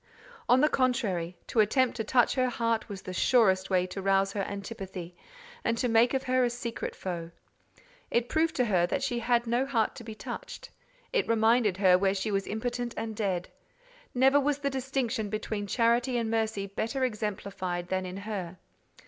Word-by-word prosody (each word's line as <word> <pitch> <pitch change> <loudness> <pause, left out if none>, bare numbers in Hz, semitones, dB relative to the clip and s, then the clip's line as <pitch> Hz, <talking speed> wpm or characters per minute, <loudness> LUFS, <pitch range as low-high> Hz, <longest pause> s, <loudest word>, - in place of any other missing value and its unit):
On 255 +1 +6
the 300 - +5
contrary, 220 - 0
to 230 - -1
attempt 250 +4 +3
to 225 - -1
touch 245 +2 +3
her 255 -2 +1
heart 230 -2 -1
was 195 -2 -7
the 185 - -6
surest 190 -3 +3
way 185 -2 +2
to 190 +2 -6
rouse 195 0 +2
her 205 - -1
antipathy, 195 -3 -6 0.5
and 230 -1 0
to 250 - +1
make 235 +3 +4
of 265 - 0
her 255 0 +2
a 245 - +2
secret 240 -1 -5
foe. 170 -3 -5 0.8
It 235 0 +1
proved 320 +3 +1
to 250 - +2
her 180 -5 +2
that 275 - -1
she 245 -3 -1
had 235 0 +2
no 240 +2 +1
heart 235 -5 0
to 240 - -8
be 220 -1 -8
touched: - - -8 0.4
it 470 - +1
reminded 225 -3 +3
her 185 -2 +5
where 195 0 +2
she 200 +2 -2
was 195 -1 -1
impotent 240 +2 -3
and 225 -1 -4
dead. 190 -4 -1 0.7
Never 265 +3 +5
was 285 0 +1
the 280 -1 -2
distinction 260 -4 -2
between 215 -1 -3
charity 240 +3 +2
and 225 -1 -1
mercy 220 -3 0
better 225 +7 -2
exemplified 195 -6 -3
than 185 0 0
in 180 +1 -6
her. 195 -4 -5
225 Hz, 185 wpm, -29 LUFS, 195-245 Hz, 0.8 s, On